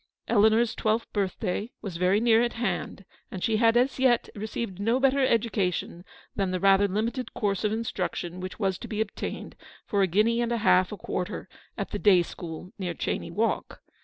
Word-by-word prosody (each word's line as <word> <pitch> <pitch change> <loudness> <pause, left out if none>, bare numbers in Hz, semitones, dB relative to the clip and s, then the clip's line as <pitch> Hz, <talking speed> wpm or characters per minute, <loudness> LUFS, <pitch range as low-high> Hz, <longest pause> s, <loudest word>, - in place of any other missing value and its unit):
Eleanor's 220 +1 +4
twelfth 220 +1 -1
birthday 200 +1 -2
was 190 -6 -5
very 185 +3 +3
near 230 0 +4
at 240 0 0
hand, 195 -4 -3 0.2
and 185 - -6
she 220 -1 +2
had 230 +1 +4
as 255 +2 +1
yet 255 -2 +3
received 210 -2 -5
no 230 +5 +1
better 270 0 +3
education 200 -7 0 0.3
than 195 -2 0
the 185 0 -1
rather 195 +1 +5
limited 225 +5 -2
course 200 -2 -1
of 210 - +1
instruction 185 -5 -3
which 185 0 -6
was 195 -4 -1
to - - -7
be 215 - -4
obtained 220 -1 -4 0.3
for 200 - 0
a 190 - +4
guinea 215 +6 +2
and 240 0 -1
a 235 - +1
half 185 -4 +3
a 210 - -5
quarter 180 0 -4 0.3
at - - -4
the - - -3
day 190 -5 +5
school 170 +1 -8
near 175 -3 -3
Cheyne 170 - -3
Walk. 225 +2 -1
210 Hz, 190 wpm, -27 LUFS, 185-230 Hz, 0.3 s, rather